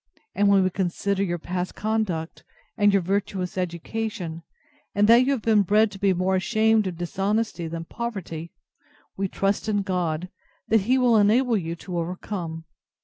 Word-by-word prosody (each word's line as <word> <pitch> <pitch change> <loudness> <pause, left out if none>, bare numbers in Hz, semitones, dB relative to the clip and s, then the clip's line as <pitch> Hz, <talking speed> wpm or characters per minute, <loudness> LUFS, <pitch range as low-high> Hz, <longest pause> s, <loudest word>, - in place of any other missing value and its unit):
And 205 0 +2
when 200 -1 +5
we 185 - +1
consider 190 +2 -1
your 175 -3 0
past 180 +2 -4
conduct, 210 -7 -2 0.3
and 205 -1 +4
your 195 -2 +2
virtuous 190 -1 -2
education, 180 0 -4 0.5
and 205 +1 +4
that 235 +3 +7
you - - +3
have 260 -6 -1
been 220 -2 +4
bred 210 +2 +3
to 195 - -10
be 200 -1 +3
more 185 +1 +1
ashamed 220 +2 +2
of 180 -3 -5
dishonesty 195 +1 -1
than 165 0 -5
poverty, 185 -8 -5 0.6
we 195 0 -1
trust 195 +3 -1
in 205 -2 +1
God, 180 -3 -1 0.4
that 225 -1 +4
He 260 - +5
will 245 -3 +4
enable 230 +4 +4
you 170 -4 -2
to 175 0 -5
overcome. 170 -1 -5
195 Hz, 165 wpm, -25 LUFS, 175-215 Hz, 0.6 s, that